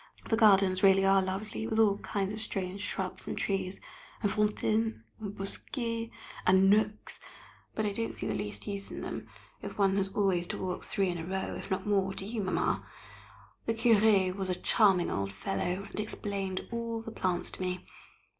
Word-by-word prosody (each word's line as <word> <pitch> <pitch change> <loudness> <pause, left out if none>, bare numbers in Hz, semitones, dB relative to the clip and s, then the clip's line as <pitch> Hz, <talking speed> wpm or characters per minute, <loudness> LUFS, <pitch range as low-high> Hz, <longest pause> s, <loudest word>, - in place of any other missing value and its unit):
The - - +5
gardens 195 -4 +5
really 195 -1 +6
are 195 0 +5
lovely, 195 +4 -3
with 220 -1 -1
all 205 -2 +4
kinds 200 0 -2
of 215 - -5
strange 195 -2 -4
shrubs 190 -2 -4
and - - -3
trees, 195 -1 -1 0.4
and 205 - +2
fontaines 115 - +1 0.2
and 205 -2 -6
bosquets, 230 +3 -4 0.3
and 190 +1 +6
nooks, 210 0 +1 0.6
but 220 - 0
I 205 - +1
don't 230 +2 -2
see - - -5
the - - 0
least 205 0 -4
use 200 -1 -4
in - - -6
them - - -5 0.3
if - - -7
one 195 -1 +3
has 195 -1 +1
always 190 -3 +1
to - - -3
walk 185 -1 -3
three 195 -2 +1
in 175 -1 -2
a - - -4
row, 190 +3 -2
if - - -7
not 190 0 -1
more, 195 -2 +1
do 190 - -4
you, 220 +1 -2
Mamma? 185 -2 0 0.8
The 225 - +1
Curé 215 -5 +4
was 190 -1 -2
a 180 - +1
charming 190 -2 +4
old 100 0 -1
fellow, 180 - -2
and - - -7
explained 200 -3 -3
all 230 -1 -3
the 225 - -7
plants 185 -5 -1
to - - -9
me. 180 0 -2
195 Hz, 190 wpm, -31 LUFS, 185-210 Hz, 0.8 s, really